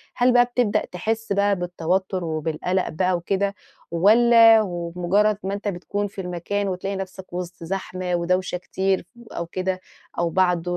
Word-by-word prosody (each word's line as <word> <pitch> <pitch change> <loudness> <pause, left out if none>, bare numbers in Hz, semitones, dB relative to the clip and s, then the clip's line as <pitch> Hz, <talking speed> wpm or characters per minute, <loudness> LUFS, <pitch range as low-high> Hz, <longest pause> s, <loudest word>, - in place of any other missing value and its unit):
هل 245 0 +3
بقى 245 0 +6
بتبدأ 245 -3 0
تحِس 220 +4 -2
بقى 200 0 +2
بالتوتُّر 180 +1 -1
وبالقَلَق 160 +3 -1
بقى 180 +3 +1
وكده، 195 +3 -1 0.4
والّا 225 +5 +6
وبمُجرّد 180 +3 0
ما 195 +1 -2
أنت 205 +1 -4
بتكون 205 +2 -2
في 195 0 -7
المكان 180 +3 -2
وتلاقي 195 +1 -3
نَفْسك 190 -1 -7
وِسط 175 -1 -6
زحمة 185 0 -3
ودوشة 180 +1 0
كتير 190 +1 -1 0.3
أو 170 - -4
كده 185 +1 -2 0.4
أو 170 -1 +1
بعد 180 -1 +2
185 Hz, 145 wpm, -23 LUFS, 175-200 Hz, 0.4 s, بقى